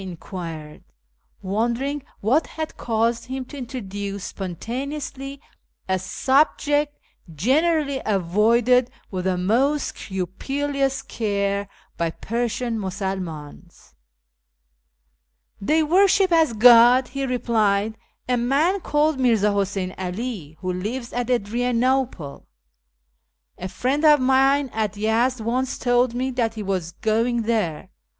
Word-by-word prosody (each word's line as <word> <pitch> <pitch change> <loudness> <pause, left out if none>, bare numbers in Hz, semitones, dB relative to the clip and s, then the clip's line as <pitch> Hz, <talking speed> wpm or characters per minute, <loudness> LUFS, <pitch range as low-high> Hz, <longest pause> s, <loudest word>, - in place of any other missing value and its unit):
I - - -7
enquired, 165 -4 -8 0.6
wondering 235 +9 -1 0.2
what 260 +10 +2
had 315 -1 -6
caused 230 +1 0
him 260 +1 -5
to 285 - -10
introduce 200 -5 -5
spontaneously 270 - -5 0.5
a 190 0 +1
subject 290 - +1 0.3
generally 280 - +1
avoided 220 +6 +3 0.2
with 185 -2 -3
the 185 -1 +1
most 255 +11 +1
scrupulous 270 +9 -2
care 200 -2 -2 0.3
by 170 -1 0
Persian 235 +4 -2
Musulmans. 180 - -6 0.8
" 65 0 -44
They 315 +1 +4
worship 380 +3 +4
as 320 -6 +4
God," 240 +3 +7
he 275 +1 -4
replied, 220 -4 +1 0.2
" - - -47
a 250 -1 +1
man 285 +11 +2
called 300 -3 +1
Mirza 225 -5 +3
Huseyn 195 -2 -1
'All, 185 - -5
who 185 -1 -2
lives 235 +7 -4
at 245 0 -2
Adrianople. 245 - 0 1.1
A 185 - -4
friend 260 - -1
of 300 -2 +7
mine 270 +1 +3
at 215 -2 -2
Yezd 230 +4 +1
once 250 +4 -1
told 245 -1 +2
me 260 +2 -1
that 235 -3 -1
he 215 - -5
was 185 -4 -2
going 230 +4 0
there. 215 -9 -1
230 Hz, 115 wpm, -23 LUFS, 195-265 Hz, 1.1 s, God